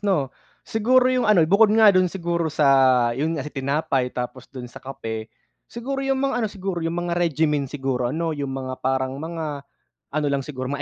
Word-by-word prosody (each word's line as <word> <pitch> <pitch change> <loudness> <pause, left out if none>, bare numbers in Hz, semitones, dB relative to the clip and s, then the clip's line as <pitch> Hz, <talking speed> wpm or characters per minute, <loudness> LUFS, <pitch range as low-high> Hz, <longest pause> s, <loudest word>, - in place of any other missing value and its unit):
'no? 170 -11 0 0.3
Siguro 250 +2 +3
yung 255 -3 +1
ano 185 -6 +6
bukod 200 +6 +5
nga 220 -2 +7
dun 185 0 +4
siguro 170 -2 -2
sa 135 -5 +4
yun 155 +6 -1
nga 140 - -4
sa, 150 - -8
tinapay 135 -2 0
tapos 125 +1 -6
dun 130 -2 -8
sa - - -12
kape, 110 -4 -6 0.4
siguro 270 +4 -4
yung 270 0 0
mga 275 -2 0
ano 220 - +1
siguro 190 -3 -4
yung 165 +1 -2
mga 175 - -2
regimen 150 -4 +1
siguro 130 -3 -2
ano 165 +4 -2
yung 140 -2 -4
mga 130 -1 -5
parang 130 0 -1
mga, 160 -3 -4 0.5
ano 150 0 -1
lang 140 -1 0
siguro 130 -2 -6
mga 145 +1 -3
150 Hz, 195 wpm, -23 LUFS, 135-185 Hz, 0.5 s, nga